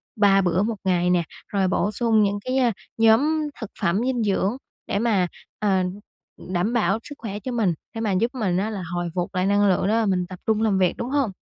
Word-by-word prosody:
3 200 -2 +4
bữa 180 +1 +1
1 225 +1 -1
ngày 180 -2 +2
nè, 180 -1 +3 0.2
rồi 195 -2 0
bổ 200 +2 0
sung 220 0 +2
những 200 0 0
cái, 255 +1 0
a, 250 -3 +3 0.3
nhóm 290 +8 +3
thực 220 - -5
phẩm 175 +5 +1
dinh 250 -3 0
dưỡng 200 +2 0 0.3
để 200 - 0
mà, 205 -6 +2 0.3
ờ, 195 -3 +2 0.5
đảm 185 +5 -2
bảo 225 -1 +2
sức 290 - -9
khỏe 205 -3 -5
cho 255 - -5
mình, 220 -7 +1 0.2
để 225 - -3
mà 215 -3 0
giúp 225 +6 +1
mình 195 -8 0
á 200 +3 0
là 200 -4 -5
hồi 175 0 -2
phục 175 +1 -2
lại 185 0 +1
năng 205 +1 +3
lượng 185 0 +2
để 210 - +2
mà 225 0 +2
mình 185 -3 +1
tập 185 0 -9
trung 220 -1 +2
làm 215 -3 +2
việc, 185 -2 +3
đúng 240 - -4
hông? 275 -6 +1
205 Hz, 235 wpm, -23 LUFS, 185-230 Hz, 0.5 s, 3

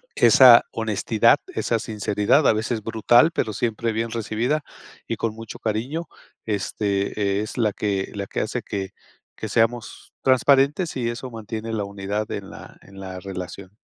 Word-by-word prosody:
esa - - +8
honestidad, - - +2 0.2
esa 115 - 0
sinceridad 105 +4 +1
a - - +6
veces 110 0 -2
brutal, 120 +7 +4
pero 110 -10 -2
siempre 115 +1 -1
bien 115 +1 -2
recibida 115 +6 -1 0.4
y - - -2
con 115 -2 -2
mucho 115 0 -9
cariño, 125 +10 -3 0.4
este, 100 -1 -1
es 110 - -6
la 110 -3 +2
que 100 -2 -2
la 100 -1 -3
que - - -3
hace 115 +3 -3
que 100 -2 -4 0.5
que 110 - -5
seamos 115 +2 -1
transparentes 140 +5 +3
y 120 -2 -1
eso 125 +2 -6
mantiene 110 0 -6
la 105 -2 -1
unidad 100 +1 -4
en 100 -1 -6
la - - -12
en 95 0 -14
la 95 -1 -7
relación. 95 +1 -8
110 Hz, 155 wpm, -23 LUFS, 100-120 Hz, 0.5 s, esa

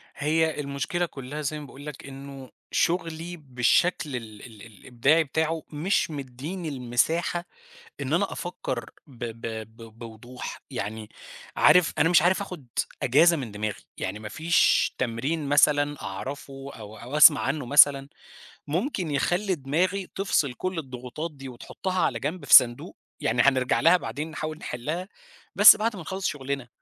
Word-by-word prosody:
هي 160 +2 0
المشكلة 145 +5 -2
كلّها 145 0 -7
زي 150 +1 -3
ما 150 - -9
باقول 140 +1 -12
لك 150 -3 -8
إنه 135 -1 -10 0.2
شُغلي 165 0 -1
بالشكل 140 +3 +1
ال 110 -4 -8
ال 110 -4 -14
الإبداعي 125 - +1
بتاعه 160 +2 -2
مش 165 +3 0
مدّيني 145 +6 -6
المساحة 145 +7 -1 0.6
إن - - -2
أنا - - +1
أفكّر - - -5 0.2
ب 125 -4 -10
ب 115 0 -8 0.4
ب 115 0 -14
بوضوح، 120 +2 -9
يعني 105 +1 -5 0.5
عارف 180 -2 +5
أنا 165 - +3
مش 175 - +6
عارف 185 +3 +2
آخُد 180 -10 -8 0.4
أجازة 160 +6 +5
من 125 -6 -5
دماغي، 105 0 -4 0.2
يعني 95 +3 -4
ما 105 -1 -8
فيش 160 +5 +2
تمرين 135 +5 -2
مثلًا 145 0 +3
أعرَفه 135 +6 -7
أو 110 -1 -11
أو 130 +5 -5
أسمَع 150 -1 +8
عنه 140 0 -2
مثلًا 140 0 +5 0.6
ممكن 180 - -2
يخلّي 180 +7 0
دماغي 180 +7 -1
تفصِل 155 -9 0
كلّ 185 +5 -4
الضغوطات 130 +3 -6
دي 135 -2 -10
وتحطّها 185 +9 -5
على 115 - +1
جنب 160 +6 -4
في - - +5
صندوق، 120 -3 +5 0.2
يعني 120 +2 +2
هنرجَع 130 -2 +2
لها 165 +2 +6
بعدين 150 +2 -5
نحاول 155 0 -5
نحلّها، 155 +11 -5 0.5
بس 205 +1 +9
بعد 220 +1 -1
ما 180 - -7
نخلّص 190 +4 -4
شُغلنا. 135 -3 -4
145 Hz, 150 wpm, -26 LUFS, 125-165 Hz, 0.6 s, بس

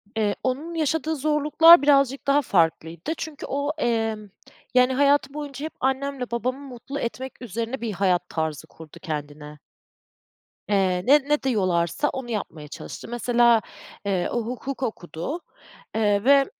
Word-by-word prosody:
Eee, 210 -2 +1
onun 280 +6 -2
yaşadığı 320 0 0
zorluklar 305 +3 +6
birazcık 275 -2 +3
daha 280 +1 +4
farklıydı 165 - 0
çünkü 315 -2 -6
o, 285 +2 -1
emm, 225 -5 -1 0.4
yani, 250 +1 +4
hayatı 280 0 +3
boyunca 290 -1 -6
hep 315 - -6
annemle 265 -1 -2
babamı 250 +3 -2
mutlu 275 +1 -7
etmek 255 +2 -5
üzerine 230 +3 -4
bir 230 -2 -2
hayat 180 -2 +1
tarzı 160 -1 -3
kurdu 160 -2 -14
kendine. 150 -1 -6 1.1
Eee, 190 -3 +2
ne 285 +3 +7
ne 295 0 +2
diyorlarsa 195 - +1
onu 260 -2 -5
yapmaya 160 -8 -5
çalıştı. - - -9
Mesela, 240 -1 +3 0.4
eee, 190 -3 0
o 240 - 0
hukuk 255 +2 -5
okudu, 200 - -4 0.6
eee, 205 -2 +2
ve 275 +2 +6
245 Hz, 135 wpm, -24 LUFS, 195-280 Hz, 1.1 s, ne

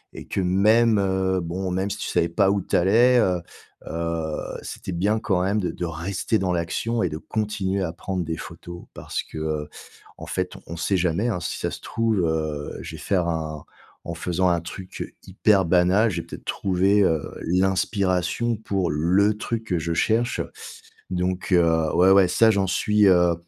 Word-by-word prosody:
et - - -9
que, - - -1
même, 105 +4 +4
heu, 95 -1 +1
bon, 90 +2 -3
même 95 +2 -1
si - - -4
tu - - -4
savais 85 - +1
pas 95 +3 +3
où 100 -1 0
tu - - -2
allais, 115 +8 +5
heu, 90 -5 +2 0.5
heu, 85 -1 -2 0.3
c'était - - -7
bien 100 +5 +1
quand 95 -5 0
même 100 +3 +1
de 90 - -1
de 90 - -4
rester 90 +6 -2
dans 95 -2 0
l'action 90 +7 -1
et - - +1
de 75 - -5
continuer 100 0 -2
à 85 -3 -2
prendre 90 +1 -3
des 80 -1 -4
photos 85 0 -9
parce - - -4
que, - - -11
heu, 75 -1 -3 0.5
en - - -8
fait, - - -2 0.2
on 85 - -6
sait 95 +3 +1
jamais, 90 +6 +1
hein, 105 - -1
si 85 - -4
ça - - -2
se - - -8
trouve, 115 -3 0
heu, 80 -2 -3
je 80 - -7
vais 75 - -10
faire 90 +2 0
un 80 -2 -3 0.4
en - - -4
faisant 90 +1 0
un 85 -2 +1
truc 90 +2 -8
hyper 95 0 +2
banal, 90 +6 +3
j'ai 85 -1 -2
peut-être - - -10
trouvé, 95 +2 +2
heu, 80 -5 +2 0.2
l'inspiration 95 +4 +1
pour 95 -5 -1
le 95 +8 +2
truc 115 +1 -3
que 90 -6 -1
je 85 +1 -2
cherche. 115 +7 +1 0.7
Donc, 90 +1 -2
heu, 80 -2 +3
ouais, 95 +2 +5
ouais, 95 -1 +6
ça, 110 +5 +4
j'en 100 -2 +1
suis, 105 +2 +3
heu 90 -2 +5
95 Hz, 190 wpm, -24 LUFS, 85-100 Hz, 0.7 s, ouais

